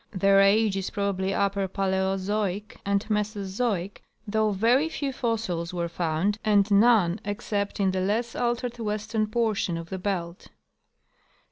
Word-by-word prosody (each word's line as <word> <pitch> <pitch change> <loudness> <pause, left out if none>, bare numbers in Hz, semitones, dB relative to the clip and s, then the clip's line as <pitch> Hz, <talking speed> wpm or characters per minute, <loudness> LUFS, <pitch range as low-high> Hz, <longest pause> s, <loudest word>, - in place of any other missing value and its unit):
Their 195 -1 +3
age 205 +1 +4
is 190 - -2
probably 195 -1 -1
upper 195 0 0
Paleozoic 195 +1 -1
and 200 0 0
Mesozoic, 205 -2 -2 0.3
though 215 +1 +1
very 235 +10 +2
few 280 -4 -3
fossils 200 -9 -2
were 170 -1 -1
found 170 +5 -1
and 205 -1 +3
none 205 -3 +4
except 205 -1 -3
in 195 -1 +2
the 185 0 -1
less 225 +5 -1
altered 240 0 -2
western 215 0 -1
portion 215 -6 0
of 165 0 -7
the 190 - -3
belt. 180 -3 -3
200 Hz, 135 wpm, -26 LUFS, 190-220 Hz, 0.3 s, age